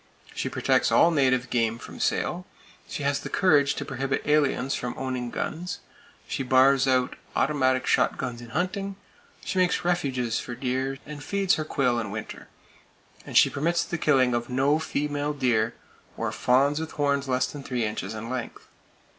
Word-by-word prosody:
She - - -2
protects - - +2
all 170 - +5
native 130 -4 +2
game 115 -2 +1
from - - -11
sale; - - -1 0.4
she - - -5
has 140 0 +1
the - - -7
courage 150 -7 +3
to - - -4
prohibit 135 +1 -2
aliens 140 -3 +2
from 125 -1 -3
owning 130 -2 -3
guns; 175 +8 -4 0.5
she - - -3
bars 135 +1 +4
out 130 -1 +2 0.2
automatic 130 -2 +2
shot - - +2
guns 120 -1 -4
in 120 - -10
hunting; 195 +6 -2 0.5
she 190 - -1
makes 180 -1 +1
refuges 130 -10 0
for 120 - -6
deer, 130 +2 -2
and 145 -1 -8
feeds 200 -1 +1
her 155 - -1
quail 125 -5 +1
in 110 -3 -4
winter, 110 +2 -7 0.8
and - - 0
she - - +8
permits 170 +4 0
the 175 - -4
killing 130 -5 +3
of 120 +1 -2
no 135 +4 +2
female 145 -1 -2
deer, 115 -5 +1 0.4
or - - -2
fawns 140 +4 +2
with 160 0 -5
horns 140 -1 0
less 130 0 +2
than 140 +3 -7
three 125 -4 -2
inches 105 -1 -4
in 110 +1 -6
length. 125 -1 -5
135 Hz, 170 wpm, -26 LUFS, 125-150 Hz, 0.8 s, she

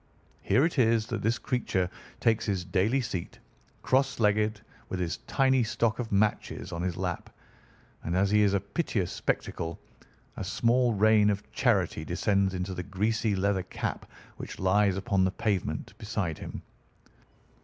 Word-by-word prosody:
Here 135 - +3
it 165 -4 -1
is 115 -2 +3
that - - -1
this 115 +2 +1
creature 105 -8 -1 0.3
takes 115 -2 +2
his 95 -4 -1
daily 100 +9 +1
seat, 95 -8 -5 0.5
cross 135 0 +2
legged 105 0 +2 0.3
with 95 - -3
his 90 0 -2
tiny 130 -1 +3
stock 115 0 0
of 120 -2 -4
matches 105 +1 0
on 85 - -4
his 90 -1 -2
lap, 90 -2 -3 0.7
and 85 - -2
as 100 +1 +2
he 105 0 +5
is 100 -1 +3
a - - +3
piteous 100 - -2
spectacle 85 0 -2 0.6
a - - -3
small 115 +5 +2
rain 105 0 +5
of 100 -1 -3
charity 105 -11 +1
descends 95 +3 +1
into 90 +1 -3
the 90 - -4
greasy 105 +3 0
leather 95 0 +1
cap - - -5 0.3
which - - -7
lies 95 0 +3
upon 100 -2 +1
the 95 - +3
pavement 100 -1 -2
beside 100 -7 -3
him. - - -7
100 Hz, 155 wpm, -28 LUFS, 95-115 Hz, 0.7 s, he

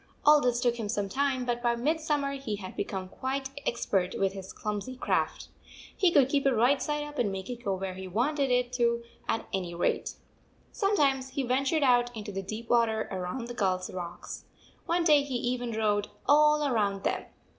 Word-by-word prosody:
All 300 0 +7
this 245 -2 +1
took 240 -1 +1
him 210 -2 -3
some 205 -1 -1
time, 265 +2 0
but 240 -1 -1
by 240 -1 +2
mid 300 +7 0
summer 295 -3 0
he 270 -6 -3
had 190 -2 -8
become 190 -2 -3
quite 270 +6 -3 0.2
expert 195 -6 0
with 195 -1 +1
147 - - -9
his 190 - -10
clumsy 210 +4 -4
craft. 255 - -1 0.5
He 370 - +4
could 280 -5 +5
keep 280 0 +1
it 265 - +3
right 250 +5 +3
side 295 0 -1
up 295 -1 -7
and 220 -5 +1
make 195 +4 -5
it 240 -1 -7
go 195 -3 0
where 190 0 -4
he 190 0 -7
wanted 270 - 0
it 250 0 +1
to 235 -1 +1 0.3
at 225 - 0
any 180 -3 -2
rate. 170 - 0 0.6
Sometimes 280 -10 +1
he 270 +1 -2
ventured 275 +5 +1
out 245 -2 +4
into 210 -1 -6
the 195 0 -3
deep 215 +4 -6
water 230 -2 +2
around 190 +6 -4
the 240 - -6
gulls 185 -5 -1
rocks. 175 -1 -7 0.4
One 340 +1 +2
day 300 -3 +6
he 280 -2 -4
even 245 0 -1
rowed 210 -2 +1 0.2
all 300 0 +5
round 200 -4 0
them. - - -1
240 Hz, 200 wpm, -29 LUFS, 205-275 Hz, 0.6 s, All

